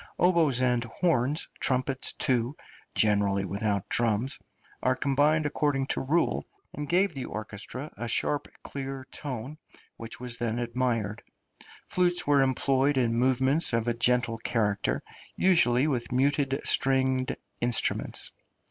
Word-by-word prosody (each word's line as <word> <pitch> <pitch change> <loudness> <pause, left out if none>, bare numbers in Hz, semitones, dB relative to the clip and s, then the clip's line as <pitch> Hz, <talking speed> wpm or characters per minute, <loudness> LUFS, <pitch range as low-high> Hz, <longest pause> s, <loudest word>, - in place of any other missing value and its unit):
Oboes 165 -8 +3
and 125 -2 +2
horns, 145 +1 0
trumpets 130 +1 0
too 125 +1 0 0.4
(generally 100 -2 +2
without 100 +1 -1
drums), 120 +2 0 0.4
are 130 +1 +2
combined 145 +3 +2
according 145 -2 0
to - - -2
rule, 160 +6 +1 0.3
and 150 -1 -5
gave 185 +1 +3
the 135 -3 -5
orchestra 110 +7 -6
a 120 - -5
sharp 145 +5 0 0.2
clear 135 -1 -6
tone, 140 +1 -6 0.4
which 115 0 -8
was 125 -1 -5
then 115 -1 -1
admired; 120 -3 -1 0.7
flutes 180 -1 +1
were 145 -1 +4
employed 135 +1 +2
in 120 -3 +2
movements 130 +5 +2
of 115 0 +1
a 120 - +2
gentle 120 -1 +1
character, 105 -3 0 0.3
usually 140 -9 +4
with 125 -6 -1
muted 135 +1 +1
stringed 130 -1 +1 0.2
instruments. 120 -1 0
130 Hz, 125 wpm, -28 LUFS, 115-140 Hz, 0.7 s, were